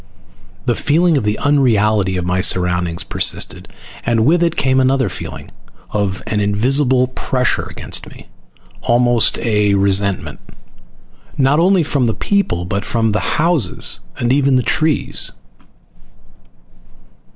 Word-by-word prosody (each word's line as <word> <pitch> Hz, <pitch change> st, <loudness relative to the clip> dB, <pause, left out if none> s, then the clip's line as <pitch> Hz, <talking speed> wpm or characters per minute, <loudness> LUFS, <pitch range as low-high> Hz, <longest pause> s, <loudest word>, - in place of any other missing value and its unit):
The -, -, +1 dB
feeling 165 Hz, +3 st, +1 dB
of 140 Hz, -, 0 dB
the 105 Hz, 0 st, -1 dB
unreality 110 Hz, -9 st, +1 dB
of 90 Hz, -, -3 dB
my 90 Hz, +1 st, 0 dB
surroundings 90 Hz, -2 st, 0 dB
persisted, -, -, 0 dB, 0.4 s
and 115 Hz, -2 st, +1 dB
with 170 Hz, +5 st, +3 dB
it 170 Hz, -1 st, +1 dB
came 130 Hz, -1 st, +1 dB
another 130 Hz, -3 st, +1 dB
feeling, -, -, -8 dB, 0.4 s
of 100 Hz, -2 st, -2 dB
an 105 Hz, -, -2 dB
invisible 125 Hz, +5 st, +1 dB
pressure 130 Hz, 0 st, -2 dB
against -, -, -4 dB
me. -, -, -15 dB, 0.5 s
Almost 120 Hz, 0 st, +2 dB
a 105 Hz, -3 st, +1 dB
resentment. 100 Hz, -1 st, 0 dB, 1.0 s
Not 135 Hz, +2 st, +2 dB
only 185 Hz, 0 st, +3 dB
from 140 Hz, -3 st, 0 dB
the 115 Hz, -, -1 dB
people, 195 Hz, -, -1 dB
but 100 Hz, +2 st, -3 dB
from 115 Hz, -2 st, -1 dB
the 105 Hz, -, 0 dB, 0.2 s
houses 155 Hz, -, +1 dB, 0.2 s
and 120 Hz, +1 st, 0 dB
even 140 Hz, -1 st, +2 dB
the 125 Hz, -, +2 dB
trees. 155 Hz, +6 st, +1 dB
120 Hz, 130 wpm, -16 LUFS, 100-140 Hz, 1.0 s, with